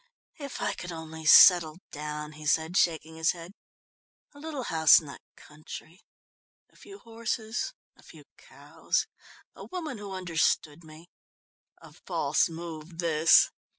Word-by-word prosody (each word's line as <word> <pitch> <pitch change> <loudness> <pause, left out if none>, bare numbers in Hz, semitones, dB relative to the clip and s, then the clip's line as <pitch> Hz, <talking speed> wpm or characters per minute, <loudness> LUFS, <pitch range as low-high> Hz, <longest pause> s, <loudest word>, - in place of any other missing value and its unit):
"If 280 -2 -7
I - - -1
could 175 - -8
only 160 -1 -9
settle 165 -2 +7
down!" 150 0 -6
he 155 0 -9
said, 160 +3 +1
shaking 160 -3 0
his 160 +1 +1
head. 170 0 -11 0.8
"A 285 - -15
little 295 -3 -6
house 160 -7 +5
in 160 - -13
the 140 - -10 0.2
country, 155 +3 -12 0.7
a - - -30
few 395 0 -13
horses, 230 - -4 0.2
a - - -22
few - - -16
cows, - - -4 0.5
a - - -11
woman 320 - -6
who 205 -1 -8
understood 170 -3 -1
me...." 160 +2 -15 0.7
A - - -15
false - - -1
move 165 0 -9
this. 165 -2 +4
165 Hz, 140 wpm, -27 LUFS, 155-200 Hz, 0.8 s, settle